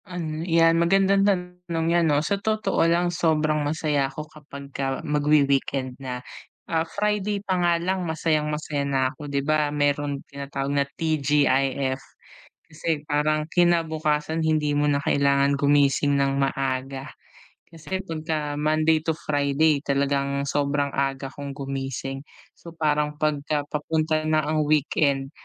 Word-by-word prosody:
Ano 160 -3 -4
'yan 165 -1 +3
magandang 195 +3 +3
tanong 180 -4 -1
'yan 170 -2 +3
'no. 145 +1 +2
Sa 200 -1 -1
totoo 215 +1 0
lang 175 +1 +1
sobrang 155 -3 +1
masaya 145 -2 0
ako 150 +3 -7
kapagka 140 -2 -5
magwi-weekend 140 -3 +1
na. 125 -1 -6 0.4
Ah, 165 0 -1
Friday 210 0 -1
pa 185 -1 0
nga 175 -1 +3
lang 185 +2 -1
masayang-masaya 150 -2 -1
na 130 -1 +1
ko 145 +1 -9
'di 140 -1 -1
ba 155 0 +2
meron 145 -1 -1
tinatawag 140 0 -4
na 140 -1 +2
TGIF 140 -3 +1 0.7
kasi 160 -1 -2
parang 150 +1 +1
kinabukasan 160 -2 +1
hindi 150 -2 +1
mo 145 - +2
na 140 -1 +1
kailangan 140 0 +2
gumising 145 0 +3
ng 140 0 +1
maaga. 135 0 -2 0.6
Kasi 170 +3 -5
pagka 155 -4 -3
Monday 155 +1 +2
to 160 - 0
Friday 145 0 +1
talagang 140 0 0
sobrang 140 0 0
aga 135 0 -1
kong 140 -1 -6
gumising. 135 -1 -5 0.3
So 170 - -12
parang 150 -1 0
pagka 150 -1 -1
papunta 155 +1 -1
na 155 0 +2
ang 155 0 +1
weekend, 140 -2 +1
150 Hz, 130 wpm, -24 LUFS, 140-160 Hz, 0.7 s, yan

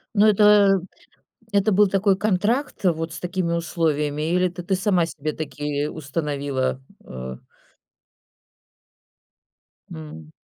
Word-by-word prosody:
Ну, 205 +1 +5
это 210 -2 +5 0.7
это 200 +1 +2
был 205 +2 +5
такой 195 0 +2
контракт 215 +7 0
вот 165 -1 0
с - - -7
такими 180 -1 -2
условиями? 155 -2 -1
Или 180 0 +3
ты 175 0 -8
ты 190 - 0
сама 185 -2 +2
себе 155 -2 -5
таки 145 -1 -3
установила? 140 -4 -3 0.2
Э 65 0 -7 2.6
М. 80 0 -10
170 Hz, 110 wpm, -23 LUFS, 145-195 Hz, 2.6 s, Ну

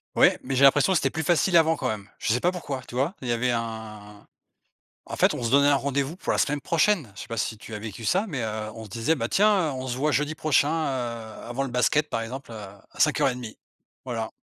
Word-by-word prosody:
Ouais - - +5
mais 135 - -3
j'ai 130 - +3
l'impression 140 +7 +6
que - - +1
c'était 135 -3 +1
plus 160 - -3
facile 175 +4 +2
avant 160 0 +4
quand 130 - -3
même. 105 -3 -4
Je - - 0
sais 125 - +1
pas 180 - +2
pourquoi, 145 -7 -5
tu 120 - -10
vois, 140 +8 0
il 125 - -5
y 120 - 0
avait 120 +1 +1
un 110 -3 -6 0.8
en - - -4
fait, - - +3
on - - -5
se 115 0 -1
donnait 140 +1 +5
un 145 - +4
rendez-vous 140 +4 -1
pour - - -2
la - - 0
semaine 145 0 +1
prochaine. 165 - +1
Je - - -8
sais - - -9
pas 115 0 -5
si 110 0 -2
tu 110 - -11
as 105 - -4
vécu 110 +1 -8
ça, 190 - +1
mais 145 - -3
heu, 110 -1 -3
on 115 - -8
se 110 - -11
disait, 115 +11 0
ben, 115 -3 -3
tiens, 200 -5 +3
heu, - - -3
on 130 0 -5
se 120 - -2
voit 150 +4 0
jeudi 150 +2 0
prochain, 155 -2 +2
heu, 125 -8 -3
avant 120 +3 -3
le 135 - -4
basket, 125 +5 +1
par 115 - -2
exemple, 125 +2 -7
à 100 -3 -10
à - - -16
05:30, 125 -4 +1 0.5
voilà. 115 -3 -3
130 Hz, 260 wpm, -25 LUFS, 115-150 Hz, 0.8 s, l'impression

